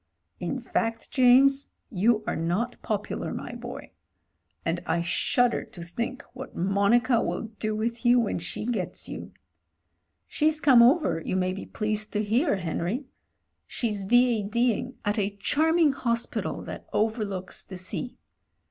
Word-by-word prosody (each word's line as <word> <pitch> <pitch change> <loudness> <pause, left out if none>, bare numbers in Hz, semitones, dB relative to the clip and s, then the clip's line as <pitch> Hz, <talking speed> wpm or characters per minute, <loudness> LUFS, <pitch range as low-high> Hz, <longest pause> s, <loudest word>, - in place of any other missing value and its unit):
"In - - -2
fact, 225 0 -2
James, 270 +2 +5 0.2
you 215 +2 +2
are - - -1
not 180 +10 -1
popular, 210 -1 -3
my - - -6
boy - - -8 0.4
— - - -46
and 170 +1 0
I 170 +1 +1
shudder 235 +7 +2
to 170 - -10
think 235 +10 -4
what 265 +1 -9
Monica 200 +6 +3
will 225 - -3
do 215 -1 -1
with 230 +2 -2
you 245 0 +5
when 220 -6 0
she 170 - -4
gets 225 -6 -2
you. - - -7 1.0
She's 305 0 +1
come 260 -6 +7
over, 235 - +4
you - - -2
may 185 0 +1
be 195 - -7
pleased 215 0 -1
to 210 0 +1
hear, 230 +7 +2
Henry. 180 - -2 0.6
She 235 - -2
is 200 -2 -3
V. 245 +1 +4
A.D. 235 +4 +1
ing 250 +4 -6
at 205 +1 +1
a 200 0 -2
charm 315 - +2
ing 320 -4 +5
hospital 235 -3 -2
that - - -8
overlooks 210 -4 -2
the 185 - -9
sea. 185 +7 -4
225 Hz, 155 wpm, -27 LUFS, 195-245 Hz, 1.0 s, come